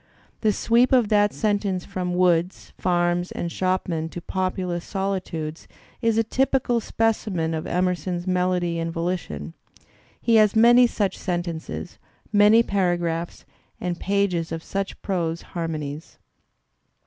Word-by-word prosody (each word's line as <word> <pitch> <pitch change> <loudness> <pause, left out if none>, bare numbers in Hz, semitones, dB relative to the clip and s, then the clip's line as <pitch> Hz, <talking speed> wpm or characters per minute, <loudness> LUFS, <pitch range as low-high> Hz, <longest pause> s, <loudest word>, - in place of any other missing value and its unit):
The 215 - +2
sweep 235 +5 +3
of 245 -5 +4
that 205 -1 +4
sen 210 -2 +1
tence 190 -3 -3
from 180 -2 -3
woods, 180 0 +1
farms 175 0 0
and 170 - -3
shopmen 180 -3 -1
to 175 - -6
populous 185 -1 -2
solitudes, 185 -5 -4 0.3
is 230 -2 +2
a 225 - +4
typical 255 0 +1
specimen 210 -8 -1
of 160 -1 -3
Emerson's 180 0 -1
melody 180 -2 0
and 165 0 -2
volitation. 165 - -3 0.7
He 230 -1 +3
has 215 -1 +4
many 240 +2 +7
such 205 -4 -1
sentences, 175 -3 -4 0.3
many 210 +3 +6
paragraphs 175 -4 -1 0.3
and 175 -1 -3
pages 195 -4 0
of 165 0 -4
such 195 0 -4
prose 170 -4 -2
harmonies. 155 -3 -5
180 Hz, 125 wpm, -24 LUFS, 170-205 Hz, 0.7 s, many